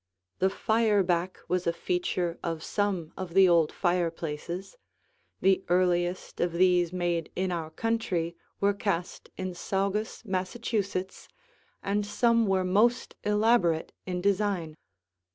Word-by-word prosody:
The 190 - +3
fireback 195 -5 +1
was 180 0 0
a - - +4
feature 175 0 -1
of 165 -2 -3
some 190 -6 -1
of 185 -2 -6
the 195 -1 +7
old 170 -3 +4
fireplaces. 175 - -2 0.7
The 190 0 +3
earliest 180 0 +1
of 175 -1 +1
these 175 -1 +3
made 175 -2 -1
in 185 0 -1
our 165 -3 -3
country 180 -3 -1 0.2
were 200 0 +3
cast 195 -3 -3
in 185 -1 -3
Saugus, 200 +5 -2
Massachusetts, 190 -1 -2 0.6
and 205 +1 0
some 230 +2 +2
were 190 -1 +2
most 225 +7 +2
elaborate 210 -6 +2
in 180 -1 -2
design. 195 -5 0
185 Hz, 120 wpm, -28 LUFS, 175-200 Hz, 0.7 s, the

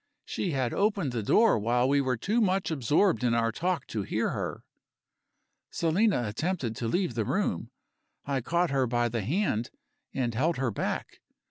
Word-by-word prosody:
She 190 - -2
had 130 -3 0
opened 200 -8 +1
the 120 -2 -2
door 215 - +4
while 120 +4 +2
we 140 +1 +3
were 130 -2 0
too 215 - 0
much 190 -3 +1
absorbed 150 - +2
in 120 -1 +2
our 115 -1 +2
talk 175 +8 -1
to 110 - -2
hear 95 - -1
her. - - -4 1.1
Selina 170 - +1
attempted 130 - -2
to 115 - -2
leave 175 +2 0
the 115 -1 0
room. - - -1 0.6
I 135 -2 -1
caught 170 +5 0
her 135 -2 +2
by 120 0 +1
the 115 -1 -2
hand, 120 - 0 0.4
and 120 -3 -1
held 155 +9 +1
her 130 -2 0
back. - - -3
135 Hz, 170 wpm, -28 LUFS, 115-180 Hz, 1.1 s, door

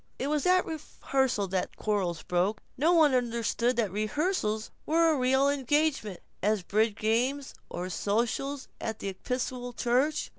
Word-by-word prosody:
It 275 - -2
was 300 +3 +1
at 365 0 +4
rehearsals 265 - -1
that 185 -1 0
the - - -24
quarrrels 190 -6 -1
broke. 185 +4 0
No 310 +6 +3
one 315 -5 +5
understood 235 0 +1
that 220 -5 0
rehearsals 215 - -1
were 330 +1 +3
as 290 - -1
real 265 +2 +3
engagements 280 - 0 0.2
as 210 -1 +1
bridge 215 +3 +1
games 250 +6 0 0.2
or 180 +1 -4
sociables 235 - -1
at 220 -1 -3
the 200 - -4
Episcopal 245 +4 -4
Church. 260 +6 +1
245 Hz, 150 wpm, -29 LUFS, 210-285 Hz, 0.2 s, one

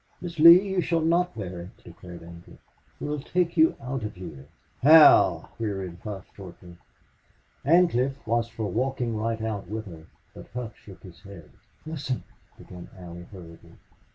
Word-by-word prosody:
"Miss 170 -2 -8
Lee, 170 +5 +8
you 190 -1 0
shall 165 0 0
not 170 -1 +1
bear 90 -4 -6
it," 90 - -12
declared 90 -2 -12
Ancliffe. 85 0 -14 0.4
"We'll 150 0 -3
take 170 +4 -1
you 160 -1 +4
out 135 -1 -5
of 105 -1 -6
here." 75 -7 -10 0.3
"How?" 155 +3 +6
queried 95 -5 -4
Hough, 100 -3 -7
shortly. 90 -2 -12 0.9
Ancliffe 140 -4 +2
was 115 +1 0
for 110 -1 -6
walking 120 +3 -2
right 110 +1 -3
out 105 -3 -4
with 110 +1 -5
her, 80 -4 -12 0.3
but - - -12
Hough 120 -3 -5
shook 95 -3 -16
his 90 -1 -14
head. 95 -8 -13 0.3
"Listen," 145 -5 -4 0.3
began 90 -1 -12
Allie, 85 -1 -10
hurriedly. 85 -4 -13
110 Hz, 155 wpm, -25 LUFS, 90-150 Hz, 0.9 s, Lee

